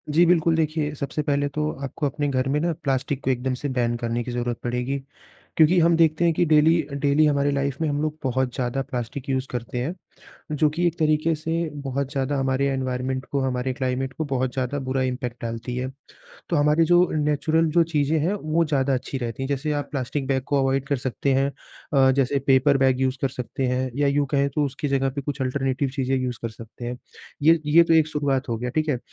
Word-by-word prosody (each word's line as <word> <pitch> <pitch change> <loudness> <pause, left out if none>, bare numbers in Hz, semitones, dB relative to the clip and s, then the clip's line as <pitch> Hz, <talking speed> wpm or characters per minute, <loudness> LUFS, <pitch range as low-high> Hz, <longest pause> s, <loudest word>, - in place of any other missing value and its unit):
जी 175 +1 +6
बिल्कुल, 165 -1 +3
देखिए, 155 -2 0
सबसे 140 +2 -3
पहले 145 -1 0
तो 150 0 0
आपको 145 +3 -3
अपने 145 +1 -1
घर 130 -1 0
में 150 +2 +1
ना 170 +2 0
प्लास्टिक 135 0 -1
को 130 - 0
एकदम 130 +1 -1
से 145 - -1
बैन 120 -2 0
करने 120 +1 -1
की 125 - -5
ज़रूरत 120 -1 -2
पड़ेगी। 125 +3 -1 0.6
क्योंकि 165 +3 +5
हम 170 0 +4
देखते 165 +1 +3
हैं 165 - +3
कि 175 - +2
डेली 160 +2 +4
अ, 140 -1 -10
डेली 145 +2 +3
हमारी 145 -1 +2
लाइफ़ 140 -1 -1
में 160 - +1
हम 145 +1 -1
लोग 155 0 -2
बहुत 130 -1 0
ज़्यादा 125 +1 -1
प्लास्टिक 125 +3 -4
यूज़ 130 0 -1
करते 125 0 -4
हैं, 150 +8 -2 0.6
जो 150 0 +2
कि 170 +4 -1
एक 170 - -2
तरीके 155 +1 +2
से 160 +2 -4 0.3
बहुत 135 +1 -2
ज़्यादा 140 0 -1
हमारे 135 +1 +1
इनवायरमेंट 130 0 -2
को, 140 - -2
हमारे 130 0 -1
क्लाइमेट 130 0 -2
को 160 - -3
बहुत 130 -2 -1
ज़्यादा 130 +2 -2
बुरा 130 0 0
इंपैक्ट 125 -1 -3
डालती 115 +2 -4
है। 130 +1 -2 0.6
तो 170 - +2
हमारी 150 +3 +4
जो 175 +2 +5
अ, - - -4
नेचुरल 150 +2 +1
जो 170 - +7
चीज़ें 150 +2 +2
हैं, 180 +7 +1
वो 165 -3 0
ज़्यादा 140 -3 +1
अच्छी 130 +1 -3
रहती 120 +1 -4
हैं। 135 - -2
जैसे 145 +2 -1
आप 140 - -8
प्लास्टिक 135 0 -3
बैग 130 -1 0
को 145 - +1
अवॉइड 135 +1 0
कर 140 - +1
सकते 130 +2 -1
हैं 135 +1 +2
अ, 135 -1 0
जैसे 140 +1 +1
पेपर 135 +1 +5
बैग 130 0 +3
यूज़ 130 0 0
कर 135 - +2
सकते 130 +1 -4
हैं 130 +1 -1
या 145 -1 +2
यूँ 140 0 +1
कहें 140 0 +3
तो 150 - +2
उसकी 140 +2 -4
जगह 135 -1 +1
पे - - 0
कुछ 140 -1 -3
अल्टरनेटिव 135 +1 -1
चीज़ें 135 0 0
यूज़ 125 -2 -2
कर 115 - -3
सकते 115 +2 -11
हैं। 125 +1 -4 0.4
ये 160 +1 +5
ये 165 +3 +7
तो 165 - +3
एक 160 -1 +5
शुरुआत 145 -3 -1
हो 115 - -1
गया। 125 +1 -3
ठीक 155 +3 -1
है? 130 -4 +1
140 Hz, 230 wpm, -24 LUFS, 130-150 Hz, 0.6 s, जो